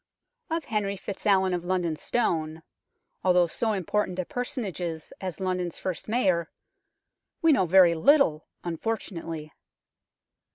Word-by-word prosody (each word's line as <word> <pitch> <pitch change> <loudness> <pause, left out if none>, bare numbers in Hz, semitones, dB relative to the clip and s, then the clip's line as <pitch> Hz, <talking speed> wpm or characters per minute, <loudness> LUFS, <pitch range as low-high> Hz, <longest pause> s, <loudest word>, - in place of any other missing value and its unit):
Of 325 -1 -2
Henry 205 -3 -1
FitzAlwin 190 -1 +1
of 175 -1 -2
London 175 -3 0
Stone, 160 -6 -1 0.6
although 180 -1 +5
so 220 +6 -1
important 190 0 -1
a 185 - -1
personage 245 -6 -3
as 165 -3 -5 0.3
London's 180 -2 -2
first 185 -3 -4
Mayor, 185 -8 +1 0.9
we 325 - +6
know 190 -11 +3
very 180 -1 +7
little, 170 - +4 0.2
unfortunately. 165 -4 -4
185 Hz, 115 wpm, -27 LUFS, 170-210 Hz, 0.9 s, very